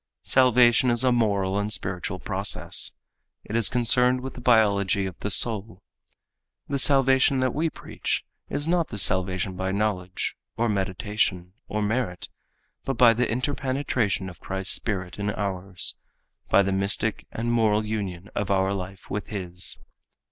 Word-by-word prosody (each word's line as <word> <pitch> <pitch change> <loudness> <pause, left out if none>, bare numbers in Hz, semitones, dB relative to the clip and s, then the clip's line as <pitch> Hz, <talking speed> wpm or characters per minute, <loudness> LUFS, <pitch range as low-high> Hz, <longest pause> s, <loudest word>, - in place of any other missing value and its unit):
Salvation 125 -1 +4
is 120 +1 +1
a 130 - +3
moral 100 -5 +1
and 105 +1 -2
spiritual 90 -3 -4
process. - - +1 0.5
It 110 - -6
is 115 -3 +6
concerned 125 +1 +3
with 130 +1 -6
the 125 - -10
biology 100 -4 +3
of 95 -2 -6
the 105 - -3
soul. 105 -3 +3 0.8
The 140 0 -2
salvation 135 0 +4
that 130 -2 0
we 160 +2 0
preach - - -4 0.2
is 145 +2 -3
not 170 -1 +1
the 105 - -7
salvation 95 0 +1
by 95 +1 -2
knowledge, 95 -3 -2 0.2
or 120 +1 +1
meditation, 95 -2 -2
or 105 0 -2
merit, 105 -4 -2 0.5
but 135 -3 -3
by 120 -1 +6
the 120 +2 -1
interpenetration 130 -5 -1
of 90 -3 -11
Christ's 95 0 -3
spirit 90 -3 -4
in 100 0 -1
ours, 95 -2 -2 0.5
by 100 - +5
the 95 - -1
mystic 100 +3 0
and 120 +1 -3
moral 110 -2 +2
union 100 -3 -5
of 105 - -3
our 95 0 +1
life 95 0 -7
with 105 +1 -4
his. 90 -4 -2
105 Hz, 150 wpm, -25 LUFS, 95-120 Hz, 0.8 s, is